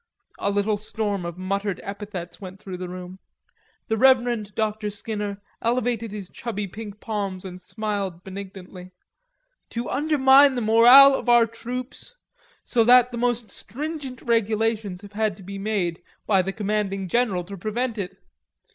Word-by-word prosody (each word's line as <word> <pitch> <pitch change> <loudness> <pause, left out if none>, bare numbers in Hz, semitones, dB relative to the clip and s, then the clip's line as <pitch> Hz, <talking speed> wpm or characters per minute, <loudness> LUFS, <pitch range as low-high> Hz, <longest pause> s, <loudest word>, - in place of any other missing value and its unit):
A - - +1
little 205 +1 +1
storm 205 -3 -3
of 170 0 -7
muttered 195 +1 -2
epithets 200 -4 -7
went 190 0 -9
through 190 -3 -7
the 180 0 -6
room. 180 +1 -8 0.7
The 220 - 0
Reverend 240 -5 +3
Dr. 215 -1 -1
Skinner 205 -1 -4 0.2
elevated 235 -2 0
his 205 -3 -6
chubby 210 0 -5
pink 210 +1 -9
palms 200 -4 -4
and 180 -1 -8
smiled 200 -3 -4
benignantly... 190 -1 -9 0.8
"to 235 +1 -4
undermine 275 -2 +5
the 245 - -1
morale 240 +5 +8
of 255 - -2
our 240 -1 +7
troops; 250 - -7 0.5
so 235 -2 +2
that 250 +1 +6
the 235 - -5
most 240 -3 0
stringent 275 +1 -6
regulations 220 -3 0
have 205 0 -12
had 215 -1 0
to 195 - -13
be 195 +1 -7
made 195 -5 -1 0.2
by 195 -3 +4
the 190 +1 -3
commanding 200 -2 -2
general 200 -3 +1
to 200 +3 -8
prevent 220 +4 -2
it. 190 0 -5
210 Hz, 150 wpm, -24 LUFS, 195-235 Hz, 0.8 s, morale